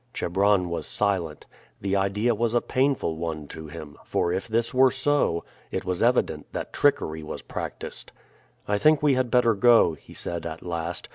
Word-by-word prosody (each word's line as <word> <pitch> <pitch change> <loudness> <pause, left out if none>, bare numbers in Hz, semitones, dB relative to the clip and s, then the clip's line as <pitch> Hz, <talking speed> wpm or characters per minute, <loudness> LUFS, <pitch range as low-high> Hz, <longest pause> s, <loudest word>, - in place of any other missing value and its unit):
Chebron 95 0 +2
was 85 - -3
silent. 90 -7 -1 0.3
The 100 0 -1
idea 100 +4 +1
was 115 +1 0
a - - +5
painful 130 - 0
one 80 -2 -4
to 80 -1 -8
him; 75 -1 -9
for 85 - 0
if 95 +4 -3
this 115 +1 0
were 130 +1 +6
so, 130 -10 +1 0.3
it - - -4
was 90 -1 -2
evident 115 -11 +1
that - - -5
trickery 80 0 +1
was 75 - -7
practiced. - - -6 0.6
"I 105 0 +1
think 155 +2 +4
we 145 -2 +5
had 130 -1 +1
better 120 -1 +4
go," 115 -4 +5
he 75 - -14
said 85 -1 -4
at 80 0 -7
last. 85 0 -4
100 Hz, 180 wpm, -25 LUFS, 85-120 Hz, 0.6 s, were